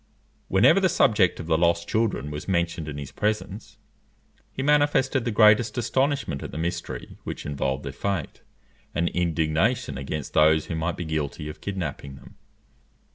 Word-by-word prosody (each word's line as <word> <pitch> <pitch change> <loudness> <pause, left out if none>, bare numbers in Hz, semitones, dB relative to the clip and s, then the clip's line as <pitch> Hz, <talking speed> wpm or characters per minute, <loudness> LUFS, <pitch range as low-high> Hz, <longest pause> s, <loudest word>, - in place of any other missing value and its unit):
Whenever 110 - +5
the 190 -1 +3
subject 105 - +3
of 85 - -5
the 80 -1 +1
lost 85 0 +2
children 110 -10 -1
was 75 0 -6
mentioned 85 -3 -1
in 75 -1 -5
his 70 -2 -7
presence, 105 0 -3 0.7
he 135 - -4
manifested 145 -3 +2
the - - 0
greatest 110 +3 +4
astonishment 130 - 0
at - - -6
the - - -7
mystery 85 +2 -5
which - - -6
involved 70 -1 -2
their 70 - -4
fate, 95 +1 -3 0.5
and 85 +2 +1
indignation 80 - 0
against 70 +1 -5
those 80 0 +4
who 85 - -4
might 80 +2 -2
be 85 - -4
guilty 75 -1 -3
of 75 - -10
kidnapping 75 -8 -5
them. - - -15
85 Hz, 160 wpm, -25 LUFS, 75-110 Hz, 0.7 s, Whenever